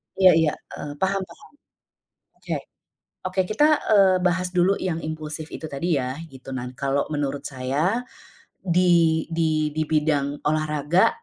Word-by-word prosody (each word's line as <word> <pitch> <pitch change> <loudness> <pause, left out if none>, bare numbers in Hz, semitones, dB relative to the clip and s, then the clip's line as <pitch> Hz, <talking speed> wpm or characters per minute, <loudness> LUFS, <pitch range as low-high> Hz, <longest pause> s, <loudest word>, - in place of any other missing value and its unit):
Iya 190 -1 +7
iya 160 -2 +3 0.2
e - - -10 0.2
paham 195 0 +1
paham. - - -15 0.9
Oke. - - -3 0.7
Oke 185 +1 +1
kita, 215 +8 +3 0.3
eee, 190 -2 +6
bahas 180 +1 +1
dulu 180 +2 +4
yang 175 -3 -1
impulsif 155 0 -5
itu - - -6
tadi 165 +5 -1
ya, 130 +1 -3
gitu. 130 -1 -12
dan 125 0 -5
kalau 140 0 0
menurut 145 -1 -2
saya, 145 - -1 0.6
di 170 -3 +3
di 155 -2 +1
di 155 0 0
bidang 150 -2 0
olahraga, 155 +2 +2
155 Hz, 140 wpm, -24 LUFS, 145-180 Hz, 0.9 s, Iya